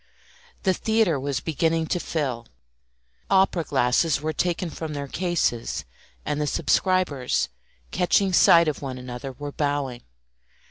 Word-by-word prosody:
The 190 - +3
theatre 220 -7 +1
was 140 -1 -2
beginning 160 +1 0
to 180 - -1
fill; 130 -9 -3 0.8
opera 190 -3 +3
glasses 135 +2 +2
were 155 +1 -2
taken 175 +1 -1
from 155 +1 -5
their 140 -1 -4
cases, 165 -8 -1 0.4
and 150 0 -1
the 150 - 0
subscribers, 155 -2 +1 0.4
catching 190 +2 +2
sight 170 -1 +6
of 150 - -2
one 130 -2 -5
another, 125 +1 -7
were 145 +2 -7
bowing. 145 -4 -2
150 Hz, 130 wpm, -24 LUFS, 135-175 Hz, 0.8 s, sight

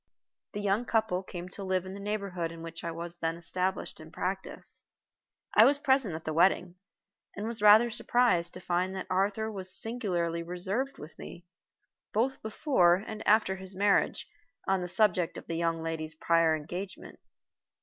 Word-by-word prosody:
The 205 - -3
young 205 +4 +1
couple 220 -6 +1
came 180 -2 -7
to 195 - -7
live 185 -1 0
in 185 - -7
the 200 - -8
neighborhood 200 -5 -3
in 165 0 -9
which 165 0 -7
I 170 - -2
was 170 +1 -6
then 165 0 -2
established 180 +2 -2
in - - -11
practice. - - -4 0.7
I - - +9
was 280 +1 +5
present 265 - +2
at 160 - -8
the 155 - -2
wedding, 180 +1 +3 0.6
and 205 - -4
was 225 -1 -4
rather 215 +3 +7
surprised 220 -7 +1
to - - -7
find 180 +1 -1
that 190 - -4
Arthur 205 +4 0
was 185 -2 0
singularly 180 -8 -1
reserved 190 +10 -3
with 155 - -11
me, 175 - -10 0.7
both 245 +5 0
before 215 - +3
and 215 +3 -6
after 210 -3 +4
his 190 0 -7
marriage, 200 +1 +2 0.4
on 190 -1 +2
the 180 - -3
subject 180 -3 +2
of - - -9
the - - -5
young 165 -1 0
lady's 160 -1 -4
prior 165 0 +3
engagement. 180 +6 -7
185 Hz, 170 wpm, -30 LUFS, 170-210 Hz, 0.7 s, I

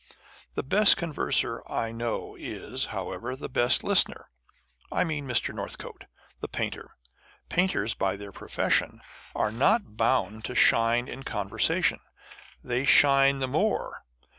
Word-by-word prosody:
The - - -2
best 200 +9 +5
converser 170 -4 -1
I 115 - -2
know 115 0 -4
is, - - -4
however, 125 +2 -5
the 135 - -7
best 125 0 +3
listener. - - +3 0.6
I - - +1
mean 150 -5 -4
Mr. 125 -4 0
Northcote, - - -8 0.3
the - - -5
painter. - - -5 0.5
Painters 180 - 0
by 95 -1 -1
their 100 0 -10
profession - - -1 0.3
are 105 - 0
not 140 - +1
bound 110 -3 0
to 125 - -5
shine 115 +1 +3
in 135 - -8
conversation, 100 -6 0 0.6
and 125 - -10
they 125 +2 0
shine 140 -1 +5
the 135 -1 -2
more. 180 +11 -2
125 Hz, 135 wpm, -27 LUFS, 115-140 Hz, 0.6 s, best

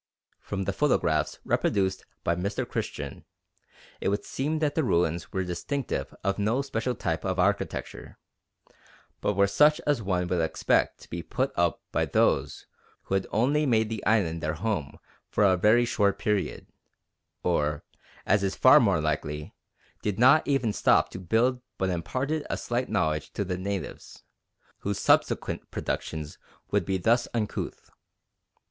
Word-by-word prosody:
From 95 -1 -4
the 100 - -2
photographs 90 - +1
reproduced 95 -2 0 0.2
by 85 - +2
Mr. 100 +4 -2
Christian - - -5 0.8
it - - 0
would 100 +1 -1
seem 150 +4 -2
that 150 -2 0
the 160 - +1
ruins 85 - 0
were 95 - -1
distinctive 90 - -3
of 100 +1 0
no 115 +7 +1
special 125 -2 -2
type 80 -5 -2
of 95 -1 -1
architecture, 100 +2 -1 1.0
but 105 - +1
were 100 +1 +5
such 150 +10 +4
as 145 -5 +1
one 90 -3 0
would 90 -1 +1
expect 80 - +1
to - - -15
be 85 - -3
put 130 +9 -2
up 85 -1 +1
by - - +1
those - - +1 0.4
who - - -5
had 95 -1 +1
only 140 +7 +2
made 110 -3 +2
the 110 -2 -4
islands 90 -7 +2
their 80 +1 -1
home 85 -6 -3 0.3
for - - +1
a 95 -2 +5
very 110 +6 +4
short 100 -4 +1
period, 105 -3 -1 0.8
or, 75 0 0 0.4
as 100 0 +3
is 95 -1 -1
far 130 - +7
more 100 -7 +3
likely, 75 -1 -3 0.5
did 105 -2 -2
not 130 +6 +6
even 130 -7 +1
stop - - +3
to - - -8
build 120 +7 +1 0.2
but 95 -1 0
imparted 135 - -2
a - - -1
slight 120 +1 -2
knowledge 75 -3 0
to 100 - -2
the 90 0 -2
natives, 95 +1 -5 0.6
whose 100 0 -2
subsequent - - +1
productions 75 -1 -4 0.3
would 100 -4 +1
be 95 +1 0
thus 115 +6 +2
uncouth. 110 -3 -3
100 Hz, 155 wpm, -27 LUFS, 90-120 Hz, 1.0 s, far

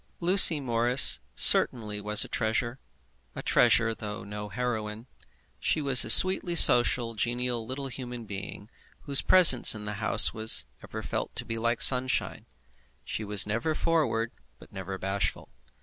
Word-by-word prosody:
Lucy 175 -3 +4
Morris 120 0 +2 0.2
certainly 105 -4 +2
was 105 0 +1
a - - -12
treasure, 120 +3 -5 0.6
a - - -9
treasure 115 -1 0
though 105 -2 -10
no 105 +1 -10
heroine. 110 -2 -7 0.5
She - - -3
was 135 -5 +4
a - - -9
sweetly 185 - +2
social, 120 -5 +2
genial 120 +1 -5
little 135 +1 -8
human 125 -2 -10
being 100 0 -11 0.3
whose 140 -2 0
presence 165 -12 +6
in 105 - -10
the 105 0 -7
house - - +3
was 110 - +3 0.2
ever - - -11
felt - - -7
to - - -5
be 115 0 -7
like 115 +1 -1
sunshine. 130 0 0 0.6
She 110 - -7
was 105 -2 0
never 115 +9 -5
forward, 150 -10 -3 0.3
but - - -20
never 95 0 -9
bashful. 95 +1 -6
115 Hz, 150 wpm, -25 LUFS, 105-130 Hz, 0.6 s, presence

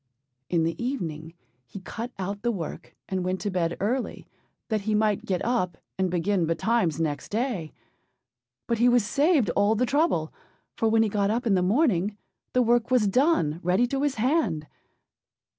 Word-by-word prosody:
In 170 -2 +2
the 165 +6 -2
evening 165 - -4 0.3
he 195 - -9
cut 230 +5 -6
out 200 +2 -4
the 240 +1 +1
work, 175 -8 -6
and 190 -1 -2
went 185 +1 -1
to 205 - -2
bed 170 -2 -1
early, 245 +6 -2 0.4
that 215 -2 0
he 215 +1 0
might 210 -1 +1
get 185 -2 -1
up 230 -8 0 0.2
and 190 -1 0
begin 175 0 0
betimes 165 0 +1
next 150 -3 -2
day; 215 - -2 0.9
but 235 -2 -1
he 245 +1 +5
was 240 -3 +3
saved 280 - +2
all 205 +4 +2
the 250 +4 +2
trouble, 270 - +1 0.4
for 225 - +1
when 225 0 +4
he - - +1
got 200 -1 +1
up 235 +4 -1
in 220 - +3
the 185 - +3
morning 205 - +2 0.4
the 250 - +4
work 235 0 +2
was 250 -5 +3
done 200 - +2
ready 185 +7 +2
to 270 +2 -2
his 285 -2 0
hand. 220 - +1
210 Hz, 175 wpm, -26 LUFS, 180-240 Hz, 0.9 s, he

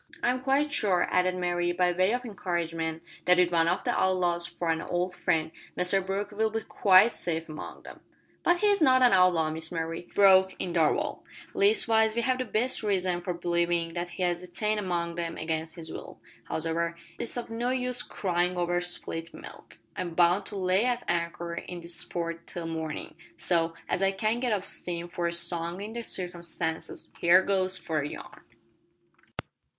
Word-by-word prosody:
"I'm 250 +1 +1
quite 275 +3 +1
sure," 195 -9 +2
added 180 0 +2
Mary, 175 -1 0
by 180 0 +2
way 185 +3 +2
of 250 +1 -2
encouragement, 165 -6 -3 0.2
"that 180 0 +5
with 180 -1 +3
one 165 -1 +3
of 175 +2 0
the - - 0
outlaws 175 -2 +1
for 170 -1 -2
an 160 - -1
old 180 +1 -2
friend, 160 -2 0 0.3
Mr 180 +2 +1
Brooke 195 +2 -3
will 220 +1 0
be 225 +1 -3
quite 200 +2 +5
safe 165 -1 -3
among 155 -1 -9
them." - - -11 0.4
"But 350 - +3
he's 405 0 +3
not 255 -3 +5
an 245 - +6
outlaw, 180 -4 +4
Miss 160 +1 -4
Mary," 165 0 -4
broke 190 -1 +6
in 175 - -3
Darvall. 160 -3 +1 0.3
"Leastwise 230 - +4
we 235 - +1
have 255 +1 +1
the 255 - -1
best 235 +3 0
reason 185 -4 0
for 175 0 -3
believin' 170 -1 0
that 175 0 -3
he's 175 -1 -1
detained 215 +3 -1
among 175 -3 -2
them 170 -1 -4
against 160 0 -3
his 160 -2 -7
will. - - -9 0.3
Hows'ever, 165 +1 -1 0.2
it's 240 - -2
of 240 -1 -5
no 235 +2 -1
use 250 -1 0
cryin' 180 -4 -1
over 175 0 0
spilt 170 -1 -1
milk. - - -12 0.2
I'm 175 -2 -4
bound 180 +3 +3
to - - -8
lay 185 +1 +2
at 245 -1 0
anchor 170 0 -2
in 175 +1 -6
this 170 0 +2
port 170 -1 -5
till 170 -1 -6
mornin', 160 -2 -5 0.2
so, 165 -2 +1
as 185 - -1
I 195 0 +3
can't 215 +5 -1
get 250 -2 0
up 205 -3 0
steam 170 -1 0
for 175 -1 -2
a - - -1
song 170 +1 +1
in 210 +2 -6
the 235 - -4
circumstances, 170 -5 -4
here 175 +2 +6
goes 190 -1 0
for 160 -3 -2
a 145 - -4
yarn." - - -10
180 Hz, 185 wpm, -28 LUFS, 170-205 Hz, 0.4 s, an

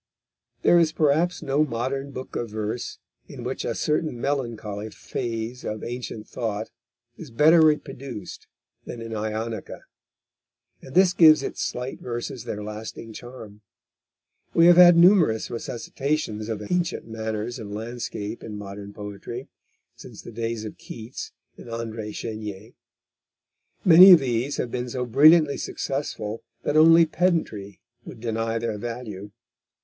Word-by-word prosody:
There 175 - +6
is 165 -2 +3
perhaps 160 +3 +1
no 145 0 +2
modern 135 +1 -3
book 130 -1 -8
of 120 - -3
verse 110 +2 -4 0.3
in - - -9
which - - -4
a - - -2
certain 150 -4 -1
melancholy 115 -6 -3
phase 115 +2 -5
of 110 0 -5
ancient 120 -3 -6
thought 110 -2 -4 0.5
is 160 - -9
better 155 +7 +5
reproduced 135 -7 -2 0.4
than 120 - -8
in 115 0 -7
Ionica, 110 0 -4 1.0
and 130 - -12
this 185 -1 +5
gives 155 -4 +7
its - - -4
slight 125 +2 -4
verses 120 0 -5
their 105 -3 -5
lasting 110 +1 -7
charm. 110 -4 -11 0.9
We 165 - +6
have 175 0 +7
had 175 -1 +9
numerous 170 - +5
resuscitations 120 -1 -3
of 105 -2 -3
ancient 180 -1 -1
manners 110 +1 -4
and 105 -3 -8
landscape 110 0 -5
in 105 -2 -7
modern 100 0 -8
poetry 105 +5 -8 0.5
since - - -12
the - - -9
days 115 -1 -3
of 105 - -9
Keats 115 +2 -8 0.3
and - - -12
André 115 -2 -5
Chenier. 110 -1 -6 1.1
Many 185 +2 +10
of 175 - +8
these 130 +1 -1
have 120 - -3
been 125 0 -3
so 125 +1 -3
brilliantly 150 +4 +6
successful 115 -6 -4 0.2
that 145 - -1
only 165 +2 +7
pedantry 155 - -1 0.2
would 115 - -11
deny 115 0 -2
their 115 -2 -3
value. 110 -4 -6
120 Hz, 135 wpm, -24 LUFS, 110-145 Hz, 1.1 s, Many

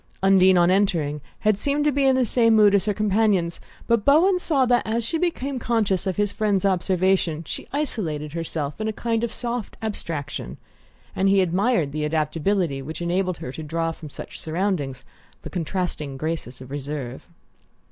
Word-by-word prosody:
Undine, 190 -1 +6
on 175 +1 +4
entering, 165 -7 +1 0.2
had 215 -2 +2
seemed 285 +4 +2
to 300 - +4
be 275 0 +1
in 265 -1 +4
the 260 -1 +2
same 230 0 +4
mood 210 -2 +6
as 200 -1 +3
her 210 - +1
companions; 205 -4 +1 0.3
but 230 -3 +2
Bowen 355 - +4
saw 285 -7 +2
that, 245 -1 +3
as 230 +2 -1
she 320 +8 -1
became 280 -6 -1
conscious 210 -6 0
of 185 - -1
his 205 -1 +1
friend's 205 -3 0
observation, 185 -3 +1
she - - -6
isolated 165 - -2
herself 160 -1 -4
in 215 - -1
a 220 - -1
kind 230 +1 -1
of 235 - -1
soft 240 -2 -4
abstraction; 155 - -4 0.6
and 195 +1 +2
he 195 0 +4
admired 185 - +1
the 150 +1 -3
adaptability 155 0 0
which 155 +4 -7
enabled 180 +1 -1
her 160 -6 -6
to 160 - -7
draw 165 +2 -2
from 160 -2 -10
such - - -8
surroundings 155 -6 -2 0.4
the - - -8
contrasting 165 -5 -3
graces 155 -5 -4
of 130 0 -11
reserve. 140 -3 -5
190 Hz, 175 wpm, -23 LUFS, 155-220 Hz, 0.6 s, Undine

